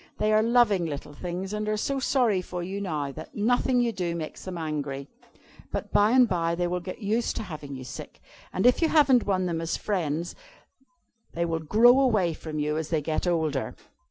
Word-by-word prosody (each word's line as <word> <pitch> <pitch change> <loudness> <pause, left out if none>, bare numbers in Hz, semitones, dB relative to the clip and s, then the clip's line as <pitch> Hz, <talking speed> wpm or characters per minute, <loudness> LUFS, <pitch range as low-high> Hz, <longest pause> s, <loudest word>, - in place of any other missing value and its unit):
They 215 0 +1
are 215 - +5
loving 220 -6 +3
little 145 -1 -6
things, 180 +5 -5
and 210 0 -2
are 215 - 0
so 275 +5 -1
sorry 240 -8 +2
for 180 -1 -5
you 195 +3 -4
now, 150 -7 -2
that 155 +4 -10
nothing 245 +4 +2
you 240 -1 +2
do 175 -5 -3
makes 160 -2 -6
them 185 -2 -5
angry. 145 -4 -4 0.6
But - - -4
by 205 +1 +5
and 250 +1 +5
by 170 -4 0
they 175 +1 -1
will 180 +1 -1
get 185 +5 -8
used 220 +4 0
to - - -3
having 150 -7 -7
you 130 - -7
sick, 125 - -9 0.3
and 185 - -1
if 250 +5 +5
you 325 - +3
haven't 270 -7 +4
won 185 -2 +1
them 165 -2 -2
as 165 - -2
friends, 170 -4 -2 1.0
they 170 0 0
will 165 -1 -1
grow 230 - +5
away 215 -11 +2
from 155 0 -7
you 150 +1 0
as 160 -1 -3
they 160 -2 +1
get 155 +3 -1
older." 160 -6 0
180 Hz, 210 wpm, -26 LUFS, 160-215 Hz, 1.0 s, are